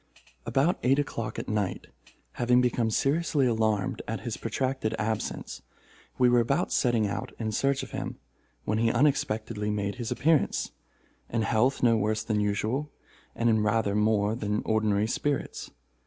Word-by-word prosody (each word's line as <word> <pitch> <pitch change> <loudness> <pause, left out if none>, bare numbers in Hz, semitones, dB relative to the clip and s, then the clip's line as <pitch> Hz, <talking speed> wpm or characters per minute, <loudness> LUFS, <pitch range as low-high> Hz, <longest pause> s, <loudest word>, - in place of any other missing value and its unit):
About 135 +9 +2
eight 135 +2 +3
o'clock 135 -5 -3
at - - -5
night, 105 -3 -2 0.5
having 125 0 +2
become 120 -2 +1
seriously 140 +4 +1
alarmed 110 -4 0
at - - -3
his - - -4
protracted 130 -4 -2
absence, 110 0 -3 0.6
we 125 - +5
were 120 0 +5
about 120 +4 +1
setting 120 -4 +2
out 100 - -4
in 110 -2 -2
search 135 +5 +1
of - - -9
him, - - -5 0.5
when 110 +1 0
he 115 0 +3
unexpectedly 115 -6 0
made 100 +1 -2
his 120 -3 -4
appearance, 155 0 +1 0.6
in 115 -1 0
health 120 +5 +1
no 115 -2 +5
worse 110 +1 0
than 110 -2 0
usual, 110 +8 -1 0.5
and 115 - 0
in 110 -2 +3
rather 105 -1 +1
more 105 0 +2
than 105 -2 -2
ordinary 110 -2 +2
spirits. 140 +4 -2
115 Hz, 155 wpm, -28 LUFS, 105-125 Hz, 0.6 s, we